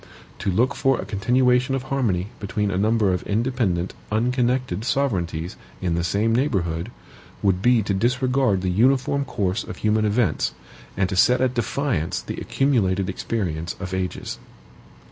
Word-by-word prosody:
To - - -1
look 120 +9 +2
for 135 -2 +1
a - - -4
continuation 125 +5 +2
of 130 - -3
harmony 115 -10 -1
between 105 0 -1
a 90 - -1
number 105 -2 +2
of 90 - -1
independent, 105 -5 -1 0.2
unconnected 125 -2 0
sovereignties 90 - -1 0.2
in 90 -2 -1
the 85 0 0
same 105 +6 +1
neighborhood, 90 - 0 0.5
would 95 -2 +2
be 120 0 +4
to 100 - -1
disregard 125 -1 +1
the 90 - +1
uniform 135 +6 +2
course 105 -4 -1
of - - -8
human 110 0 +1
events, 110 +3 +1 0.4
and 95 -1 +2
to - - -2
set 125 +7 +4
at 130 -1 +1
defiance 120 - -1
the - - -6
accumulated 100 -9 +1
experience 90 -6 -3
of 95 -1 -5
ages. 95 -1 -3
110 Hz, 150 wpm, -23 LUFS, 95-125 Hz, 0.5 s, be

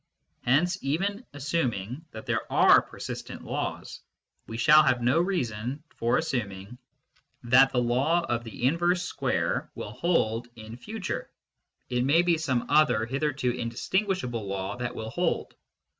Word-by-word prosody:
Hence, 175 +9 +2
even 195 - -2
assuming 135 - -2
that 110 - -9
there - - -2
are - - +6
persistent - - -8
laws, - - -4 0.5
we 115 - -6
shall 155 +5 +7
have 130 -4 +2
no 125 +6 +2
reason 130 - -2
for 115 +1 +1
assuming 115 -6 -3 0.6
that 130 +3 +6
the 125 -1 +1
law 135 +9 +2
of 120 -8 -2
the 115 0 -9
inverse 175 +5 +2
square - - -1
will 105 - -6
hold 120 -6 0
in 110 0 -9
future; 195 - -5 0.6
it 125 0 0
may 155 +6 +4
be 170 -2 +2
some 130 -6 0
other 150 -7 +3
hitherto 135 0 -1
indistinguishable 125 - -2
law 95 0 -3
that 125 -1 -4
will 110 0 -5
hold. 175 +4 -1
130 Hz, 140 wpm, -27 LUFS, 115-165 Hz, 0.6 s, shall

